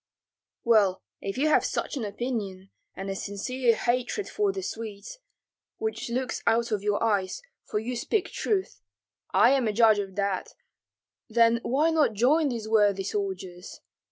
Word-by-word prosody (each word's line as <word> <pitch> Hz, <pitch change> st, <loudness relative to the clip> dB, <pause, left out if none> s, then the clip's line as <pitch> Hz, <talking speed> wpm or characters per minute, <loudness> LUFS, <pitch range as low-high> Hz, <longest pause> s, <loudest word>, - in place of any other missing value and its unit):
"Well, 205 Hz, -, +3 dB, 0.2 s
if 195 Hz, +3 st, -4 dB
you 290 Hz, +4 st, +2 dB
have -, -, +4 dB
such -, -, -2 dB
an 260 Hz, -, -3 dB
opinion, 200 Hz, -3 st, -4 dB, 0.2 s
and 195 Hz, -, -6 dB
a -, -, -3 dB
sincere 230 Hz, +5 st, 0 dB
hatred 250 Hz, -, -1 dB
for 415 Hz, -2 st, 0 dB
the 385 Hz, -1 st, -5 dB
Swedes, 220 Hz, -, -7 dB, 0.6 s
which 440 Hz, -, -3 dB
looks 250 Hz, +1 st, -2 dB
out 230 Hz, +1 st, +2 dB
of 210 Hz, -2 st, 0 dB
your 205 Hz, +1 st, 0 dB
eyes, 200 Hz, -, 0 dB, 0.2 s
for -, -, -3 dB
you 235 Hz, +4 st, -3 dB
speak 370 Hz, -, -1 dB
truth, 390 Hz, -3 st, -2 dB, 0.5 s
I -, -, +5 dB
am 270 Hz, -4 st, +2 dB
a 215 Hz, -, 0 dB
judge 220 Hz, -1 st, +5 dB
of 195 Hz, -2 st, -5 dB
that, 200 Hz, -2 st, -2 dB, 0.7 s
then 230 Hz, +1 st, +4 dB
why 295 Hz, +8 st, +2 dB
not 305 Hz, -8 st, +3 dB
join 280 Hz, +8 st, +3 dB
these 230 Hz, -4 st, -4 dB
worthy 205 Hz, -3 st, +3 dB
soldiers? 190 Hz, -2 st, -5 dB
225 Hz, 155 wpm, -27 LUFS, 200-255 Hz, 0.7 s, I